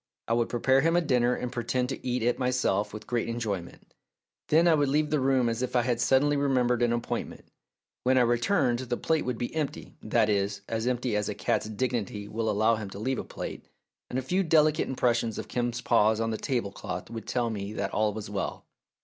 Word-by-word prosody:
I 115 - +1
would 115 0 +1
prepare 130 +3 +3
him 165 +3 +2
a - - +5
dinner 125 -5 +2
and 125 - -4
pretend 125 +1 -1
to 135 - -5
eat 125 -2 -1
it 120 +3 +1
myself 125 -5 +1
with 105 0 -8
great 120 -1 -1
enjoyment; 105 -7 -5 0.5
then 165 +3 +4
I 170 - +6
would 145 -3 +2
leave 150 +2 +1
the 150 - +2
room 130 -2 +2
as 115 +1 -1
if 125 - -3
I 120 - +4
had 120 -1 0
suddenly 135 +4 +3
remembered 125 -4 +2
an 120 -1 +3
appointment. 120 0 -3 0.6
When 130 +1 +3
I - - +6
re 120 0 +3
turned 125 -5 +2
the 125 -1 -3
plate 160 -1 0
would 125 -2 -2
be 120 - -4
empty 155 -3 -4
that 110 - +2
is, 100 -1 0
as 115 +1 -2
empty 125 -2 0
as 105 -1 0
a - - -3
cat's 105 - -1
dignity 110 -3 -2
will 110 +1 -2
allow 110 +2 +3
him 105 -3 -6
to 95 - -9
leave 130 +5 -1
a - - -3
plate, - - -7 0.4
and 125 - -3
a 130 - -1
few 180 +9 +1
delicate 155 -3 +3
impres 125 -2 +2
sions 115 -2 -3
of - - -5
Kim's 120 0 -2
paws 110 -2 +3
on 115 0 0
the 110 - -2
tablecloth 100 -7 -3
would 115 -1 -7
tell 120 -2 0
me 100 -1 -4
that 100 -2 -2
all 105 0 +2
was 105 0 -6
well. 100 -1 -4
120 Hz, 225 wpm, -28 LUFS, 110-130 Hz, 0.6 s, I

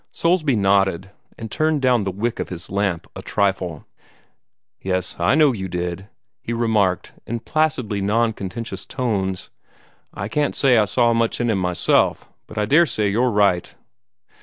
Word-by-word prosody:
Soulsby 165 -6 +1
nodded, 95 -2 +1 0.3
and 115 -1 -7
turned 155 -2 0
down 125 -5 +3
the 95 - -1
wick 110 +5 -3
of - - -3
his 90 -1 -7
lamp 95 -4 -1
a - - -7
trifle. 95 -6 -1 1.0
"Yes, 95 -1 -2
I 85 +10 +3
know 155 -3 +5
you 95 -4 -4
did," 90 +1 -4 0.3
he 120 - -4
remarked 110 -6 0
in 120 +1 -3
placidly 130 -8 0
non 110 +3 +1
contentious 105 +3 -6
tones. 95 -7 -2 0.6
"I 100 - -5
can't 145 +6 -1
say 125 -4 +4
I 105 - +3
saw 120 +4 +2
much 115 0 0
in 120 -1 +1
him 100 - 0
myself, 90 -1 +1 0.2
but 110 - -12
I 105 - +1
daresay 120 -7 +3
you're 120 +5 +2
right." 100 -5 +1
105 Hz, 160 wpm, -21 LUFS, 95-120 Hz, 1.0 s, know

